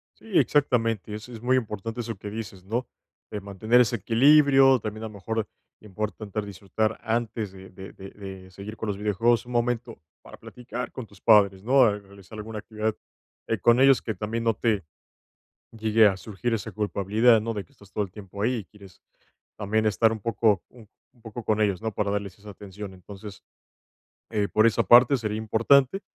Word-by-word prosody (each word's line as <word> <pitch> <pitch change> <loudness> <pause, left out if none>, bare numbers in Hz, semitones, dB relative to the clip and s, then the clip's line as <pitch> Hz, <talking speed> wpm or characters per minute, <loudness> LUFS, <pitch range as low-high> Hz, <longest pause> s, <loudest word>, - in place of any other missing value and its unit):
Sí, - - -21
exactamente. 115 -8 +1
Es 105 +3 -8
es 115 -3 -9
muy 130 +2 +2
importante 115 0 -4
eso 115 -1 -5
que 105 - -7
dices, 105 -4 -7
¿no?, 115 +6 -3 0.4
eh, 105 - -4
mantener 110 +5 +2
ese 120 0 +1
equilibrio, 135 +4 +5
también, 110 +1 -6
a - - -3
lo 110 - -11
mejor, 110 +2 -3 0.3
importante 105 0 -5
disfrutar 105 +2 -3
antes 115 -2 -2
de 95 0 -13
de 95 +1 -11
de 95 0 -10
de 95 -2 -10
seguir 100 +3 -9
con 110 - -5
los 100 - -2
videojuegos, 105 +3 +1
un 125 - -10
momento 120 -2 -1 0.2
para - - -13
platicar 125 0 -7
con 130 - -7
tus 100 -3 -20
padres, 100 -4 +5
¿no? 130 +3 +5
A 105 -3 +2
realizar 100 +1 -15
alguna 110 +1 -7
actividad, 110 +2 -3 0.5
eh, 115 - -1
con 120 +6 +4
ellos 135 -1 +6
que 110 - -4
también 115 +2 -3
no 115 -1 +1
te 110 -5 0 0.9
llegue 110 -1 +3
a 95 - +2
surgir 110 +4 -3
esa 110 0 -4
culpabilidad, 105 +3 +2
¿no?, 115 - -2
de 105 -3 -5
que - - -29
estás 100 -7 -20
todo 105 - -1
el 95 - -11
tiempo 100 0 -10
ahí 120 +5 +1
y 105 - -7
quieres 100 -1 -17 0.6
también 110 +1 0
estar 110 +2 +3
un 110 - -5
poco 105 -2 +1
un 115 -4 -16 0.3
poco 115 +1 -8
con 110 0 +1
ellos, 100 -3 +1
¿no?, 110 -1 -2
para 100 0 -1
darles 100 -2 -4
esa 105 +1 -11
atención. 100 0 -9
Entonces, 100 +2 -11 0.9
eh, 105 -3 0
por 110 +2 +3
esa 115 - +3
parte 125 +3 +6
sería 110 -2 -3
importante, 125 - +3
110 Hz, 190 wpm, -25 LUFS, 100-115 Hz, 0.9 s, ellos